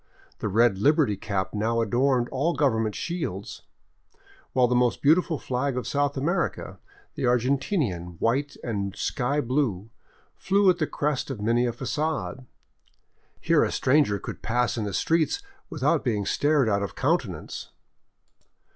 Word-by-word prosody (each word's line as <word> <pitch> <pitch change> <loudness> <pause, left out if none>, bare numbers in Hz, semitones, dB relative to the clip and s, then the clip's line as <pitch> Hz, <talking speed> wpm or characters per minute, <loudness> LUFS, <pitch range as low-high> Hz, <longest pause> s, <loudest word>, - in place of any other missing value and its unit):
The - - -2
red 110 -1 +3
liberty 145 -2 +3
cap 100 -1 -3
now 110 +2 0
adorned 120 +2 +2
all 150 +6 0
government 115 -7 +1
shields, 160 - -4 0.9
while 130 -1 +4
the 125 - 0
most 125 -1 +2
beautiful 160 +2 +3
flag 130 +1 -2
of 125 - -3
South 145 0 0
America, 170 +6 -2 0.3
the - - -3
Argentinian 125 - 0
white 135 +5 0
and 100 -4 -3
sky 140 +2 -1
blue, 115 -6 -1 0.4
flew 195 -1 +3
at 175 - -4
the 155 - +1
crest 145 -2 -2
of 135 -6 -5
many 120 +4 +2
a - - 0
fagade. 140 0 -3 0.9
Here - - +3
a - - 0
stranger 130 -6 +2
could - - -8
pass 120 +1 0
in 110 -3 -2
the 100 - -4
streets 165 - +1 0.3
without 150 -1 +1
being 105 -6 0
stared 145 0 +2
out 100 -2 +1
of 100 -4 -4
countenance. - - -2
125 Hz, 145 wpm, -26 LUFS, 110-150 Hz, 0.9 s, while